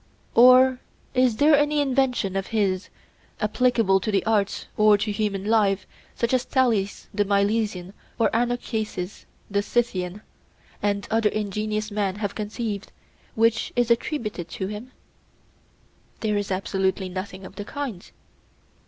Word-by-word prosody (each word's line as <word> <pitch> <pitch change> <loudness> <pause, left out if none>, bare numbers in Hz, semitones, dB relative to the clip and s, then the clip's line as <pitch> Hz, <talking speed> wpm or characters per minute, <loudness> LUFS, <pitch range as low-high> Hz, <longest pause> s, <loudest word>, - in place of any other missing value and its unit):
Or 255 +1 +7 0.3
is 255 -4 +3
there 295 +2 +6
any 295 +1 +2
invention 260 -8 +1
of 195 0 -2
his, 195 -4 0 0.5
applicable 215 -3 +2
to 190 - -3
the 200 - +1
arts 210 -3 0
or 215 -1 +5
to 210 +1 -2
human 205 -2 -2
life, 205 -3 +2 0.3
such 235 +1 -1
as 255 -1 +3
Thales 230 -8 0
the 205 0 +2
Milesian 200 -2 0 0.2
or 230 - +2
Anacharsis 225 -5 -2 0.3
the 200 0 +2
Scythian, 205 -3 -1 0.6
and 200 -1 -1
other 220 -1 +3
ingenious 215 +1 -2
men 200 -2 -1
have 205 -1 -3
conceived, 210 -1 -4 0.4
which 225 0 +2
is 240 -1 +2
attributed 215 - -1
to 190 - -4
him? 210 +6 -7 1.3
There 215 -1 0
is 205 -1 -1
absolutely 190 0 -1
nothing 185 +1 -6
of 185 - -10
the 205 - -5
kind. 245 -6 -6
210 Hz, 135 wpm, -24 LUFS, 195-235 Hz, 1.3 s, Or